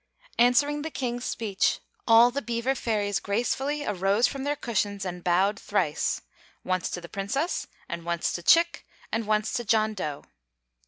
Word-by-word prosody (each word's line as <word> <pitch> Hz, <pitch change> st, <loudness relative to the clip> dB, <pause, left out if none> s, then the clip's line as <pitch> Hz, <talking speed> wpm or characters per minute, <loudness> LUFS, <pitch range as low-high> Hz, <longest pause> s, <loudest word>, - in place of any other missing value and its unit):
Answering 285 Hz, +5 st, +4 dB
the 320 Hz, -, -4 dB
King's 245 Hz, -4 st, -3 dB
speech, 205 Hz, -4 st, 0 dB, 0.3 s
all 230 Hz, +1 st, +7 dB
the 280 Hz, +3 st, -2 dB
Beaver 240 Hz, +1 st, -1 dB
Fairies 210 Hz, -6 st, -1 dB
gracefully 265 Hz, +8 st, -1 dB
arose 200 Hz, +3 st, +2 dB
from 265 Hz, +2 st, -2 dB
their 290 Hz, +1 st, 0 dB
cushions 205 Hz, -6 st, -2 dB
and 180 Hz, -1 st, -5 dB
bowed 190 Hz, +4 st, +2 dB
thrice -, -, -1 dB, 0.4 s
once 185 Hz, -1 st, -1 dB
to 175 Hz, -, -5 dB
the 170 Hz, -, -9 dB
Princess 205 Hz, -, -2 dB, 0.2 s
and 170 Hz, -1 st, -5 dB
once 170 Hz, 0 st, -1 dB
to 175 Hz, -, -3 dB
Chick 335 Hz, -, +4 dB, 0.2 s
and 225 Hz, -1 st, -1 dB
once 215 Hz, 0 st, +1 dB
to 240 Hz, -, -1 dB
John 220 Hz, -1 st, +2 dB
Dough. 150 Hz, -8 st, -4 dB
220 Hz, 160 wpm, -27 LUFS, 195-250 Hz, 0.4 s, all